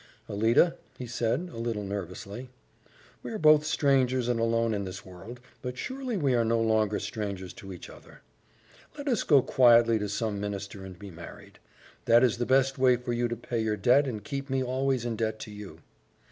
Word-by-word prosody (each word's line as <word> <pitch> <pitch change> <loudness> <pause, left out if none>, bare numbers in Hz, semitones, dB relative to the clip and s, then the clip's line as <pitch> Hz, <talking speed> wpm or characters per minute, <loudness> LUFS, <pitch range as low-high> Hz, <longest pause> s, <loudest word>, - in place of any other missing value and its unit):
"Alida," 115 +11 +3 0.2
he 125 - -6
said, 125 +8 -2
a - - -7
little 115 -3 -2
nervously, 100 +5 -6 0.7
"we - - -7
are 220 - -3
both 155 -3 +6
strangers 135 -5 +2
and 120 -2 0
alone 115 0 +1
in 100 -1 -2
this 95 0 -7
world, 95 +7 -10 0.2
but 125 0 -5
surely 260 - -4
we 140 -7 +1
are 120 -1 +3
no 115 0 +1
longer 110 -2 +2
strangers 100 -3 -5
to 95 - -10
each 90 - -9
other. - - -15 0.7
Let 285 0 -7
us 240 -7 +1
go 140 -5 +4
quietly 115 -3 +5
to 105 -1 -3
some 105 0 -2
minister 100 -1 -5
and 95 -2 -10
be 100 +1 -10
married. 85 0 -12 0.5
That 120 +1 +5
is 120 -2 +2
the 120 - -1
best 135 +1 +2
way 130 -1 +5
for 125 0 -4
you 120 0 0
to 120 - -3
pay 120 0 -4
your 110 -1 -1
debt 135 +5 +4
and 110 -5 -5
keep 140 +3 -5
me 130 0 0
always 130 -1 -1
in 115 -2 -2
debt 110 -1 -1
to 105 - -8
you." 100 -6 -10
115 Hz, 200 wpm, -28 LUFS, 105-130 Hz, 0.7 s, both